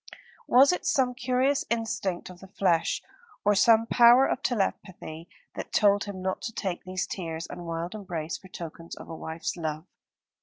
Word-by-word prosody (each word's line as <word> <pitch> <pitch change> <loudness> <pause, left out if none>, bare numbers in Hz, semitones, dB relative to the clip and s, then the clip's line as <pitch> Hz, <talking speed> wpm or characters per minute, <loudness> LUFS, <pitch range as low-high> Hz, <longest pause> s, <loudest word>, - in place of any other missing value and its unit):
Was 265 +5 +6
it 360 - -3
some 270 -8 +2
curious 255 +2 +1
instinct 225 -6 -2
of 180 - -14
the 195 - -12
flesh, 180 -3 +1 0.4
or 205 - +5
some 225 +2 +5
power 240 +3 +6
of 265 - -1
telepathy, 185 - -3 0.2
that - - -7
told 205 -1 +3
him 195 -2 -7
not 190 0 -2
to 230 - -4
take 190 -5 -4
these 185 0 -2
tears 165 -3 -5
and 175 -1 -8
wild 165 +2 -3
embrace 175 -7 -4
for 190 - -11
tokens 170 -2 -8
of - - -11
a 165 - -6
wife's 160 +1 -4
love? 160 -1 -4
190 Hz, 175 wpm, -27 LUFS, 170-235 Hz, 0.4 s, Was